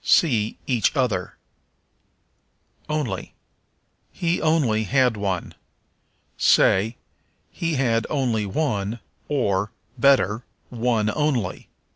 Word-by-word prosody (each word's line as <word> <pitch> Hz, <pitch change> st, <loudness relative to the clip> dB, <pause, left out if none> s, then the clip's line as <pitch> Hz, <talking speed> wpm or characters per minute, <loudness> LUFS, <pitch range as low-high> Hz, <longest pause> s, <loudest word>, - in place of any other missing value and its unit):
See 115 Hz, -10 st, +3 dB
Each 125 Hz, 0 st, +1 dB
Other. 130 Hz, -5 st, -1 dB, 1.5 s
Only. 140 Hz, -11 st, -3 dB, 0.8 s
"He 170 Hz, 0 st, -1 dB
only 135 Hz, -9 st, +2 dB
had 125 Hz, 0 st, +2 dB
one." 95 Hz, -4 st, -3 dB, 0.9 s
Say, 110 Hz, +5 st, +4 dB, 0.5 s
He 165 Hz, -2 st, -2 dB
had 115 Hz, -4 st, +1 dB
only 120 Hz, -7 st, 0 dB
one, 110 Hz, -3 st, -1 dB, 0.3 s
or, 105 Hz, -7 st, 0 dB, 0.3 s
better, 115 Hz, -5 st, +3 dB, 0.3 s
one 115 Hz, -3 st, +1 dB
only. 140 Hz, -11 st, -1 dB
120 Hz, 85 wpm, -23 LUFS, 105-140 Hz, 1.5 s, Say